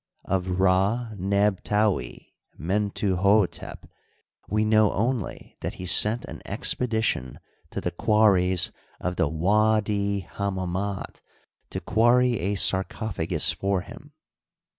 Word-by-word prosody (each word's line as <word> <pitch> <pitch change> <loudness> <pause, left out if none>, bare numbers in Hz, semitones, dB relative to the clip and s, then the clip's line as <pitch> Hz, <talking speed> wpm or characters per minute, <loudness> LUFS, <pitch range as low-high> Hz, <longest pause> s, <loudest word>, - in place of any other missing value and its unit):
Of 90 -1 -1
Rd 100 +4 +1
neb 100 +1 +1
taui 105 -1 -1 0.3
Mentuhdtep 100 +2 0 0.7
we 105 +1 +1
know 110 -1 +4
only 115 +1 -3
that - - -4
he 90 - -7
sent 105 +6 +4
an - - -9
expedition 110 - -1 0.3
to - - -5
the - - -3
quarries 95 -4 +3 0.3
of 90 0 -3
the 80 - +1
W4di 100 +2 +1
Hammamit 95 +1 -4 0.5
to 95 - -4
quarry 120 +5 +3
a 100 +4 -1
sarcophagus 95 -3 +1
for 100 -1 -1
him. 130 +9 -13
100 Hz, 105 wpm, -25 LUFS, 95-110 Hz, 0.7 s, know